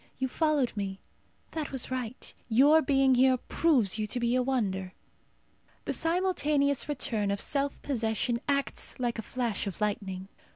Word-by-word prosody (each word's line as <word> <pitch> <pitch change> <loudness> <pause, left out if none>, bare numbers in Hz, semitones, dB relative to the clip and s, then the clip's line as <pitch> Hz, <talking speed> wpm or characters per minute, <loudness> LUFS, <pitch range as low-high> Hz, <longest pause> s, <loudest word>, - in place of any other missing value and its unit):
You 260 - -1
followed 295 -3 +1
me. 195 -2 -4 0.5
That 315 -3 -4
was 265 -1 -3
right. 255 -2 -5 0.2
Your 285 +7 +6
being 270 -3 +3
here 255 +1 +4
proves 245 - +2
you 215 - -1
to 245 +4 -2
be 235 0 +1
a 255 - +3
wonder." 195 -8 -1 0.9
The - - -1
simultaneous 305 -6 +1
return 225 -7 -1
of 200 0 -1
self 280 +4 -1
possession 235 -2 -1
acts 280 -1 -1
like 240 -2 -1
a - - -1
flash 230 -3 -2
of 195 - -5
lightning. 195 -3 -2
255 Hz, 155 wpm, -29 LUFS, 215-280 Hz, 0.9 s, Your